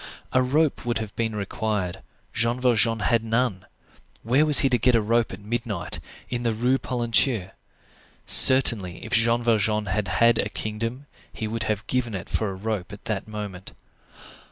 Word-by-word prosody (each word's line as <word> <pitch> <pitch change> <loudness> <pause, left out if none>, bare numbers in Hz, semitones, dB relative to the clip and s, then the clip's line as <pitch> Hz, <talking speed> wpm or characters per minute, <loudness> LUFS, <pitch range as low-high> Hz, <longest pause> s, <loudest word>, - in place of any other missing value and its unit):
A 130 - +4
rope 145 +4 0
would 120 -1 -2
have 110 -2 -6
been 110 -2 -2
required; 100 -2 -3 0.3
Jean 115 +2 0
Valjean 115 -3 +2
had 115 +1 +1
none. 115 -4 -1 0.6
Where 135 +7 +2
was 150 - +9
he 135 - +2
to 125 -2 +1
get 120 +2 +3
a - - +4
rope 115 +2 0
at 95 - -8
midnight, 105 -5 -4 0.3
in 120 -1 -4
the 115 -2 -1
Rue 125 +4 0
Polonceau? 120 -4 0 0.7
Certainly, 115 -9 +5
if - - -7
Jean 115 +1 +2
Valjean 110 -2 +1
had 100 +1 -2
had 115 +4 +3
a - - -1
kingdom, 115 +5 -5 0.3
he 110 - -5
would 115 +1 -3
have 105 -1 -3
given 120 -4 -2
it 95 - -8
for 110 - -1
a 95 - -6
rope 100 -1 -4
at 105 +2 -12
that 110 -3 -4
moment. 105 -4 -8
115 Hz, 175 wpm, -24 LUFS, 105-120 Hz, 0.7 s, was